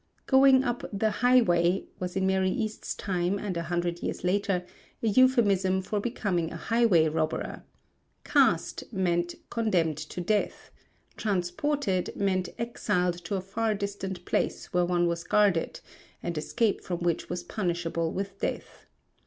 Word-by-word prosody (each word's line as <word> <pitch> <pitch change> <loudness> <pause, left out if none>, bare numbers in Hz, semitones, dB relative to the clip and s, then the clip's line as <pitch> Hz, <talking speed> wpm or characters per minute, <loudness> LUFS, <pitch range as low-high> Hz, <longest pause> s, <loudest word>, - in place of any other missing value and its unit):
"Going 265 -1 +6
upon 245 -2 -3
the 215 +1 +1
highway" 195 -7 +3
was 180 -1 -4
in 190 0 +1
Mary 190 0 +2
East's 220 0 -3
time 180 0 -1
and 200 -2 -4
a 170 - -1
hundred 175 0 -1
years - - -4
later 185 -1 0 0.4
a - - +2
euphemism 200 -6 +3
for 210 +2 -2
becoming 200 -7 -1
a - - -7
highway 220 -6 +3
robber; 155 0 -2 0.6
"cast" - - +2
meant 175 -4 0 0.2
condemned 180 -10 +1
to 155 +3 -6
death; 205 +4 -1 0.5
"transported" 195 +2 -1
meant 185 -2 0
exiled 180 -7 -1
to 200 - -2
a 190 - -1
far 215 +3 -1
distant 195 -3 -5
place - - -2
where 180 0 +3
one 175 0 +2
was 170 0 -1
guarded, 200 -5 +2 0.4
and 170 - -3
escape 210 +8 0
from 175 -2 -4
which 170 -2 -1
was 175 0 -3
punishable 170 -3 -2
with 195 0 -5
death. - - -5
190 Hz, 145 wpm, -28 LUFS, 175-215 Hz, 0.6 s, Going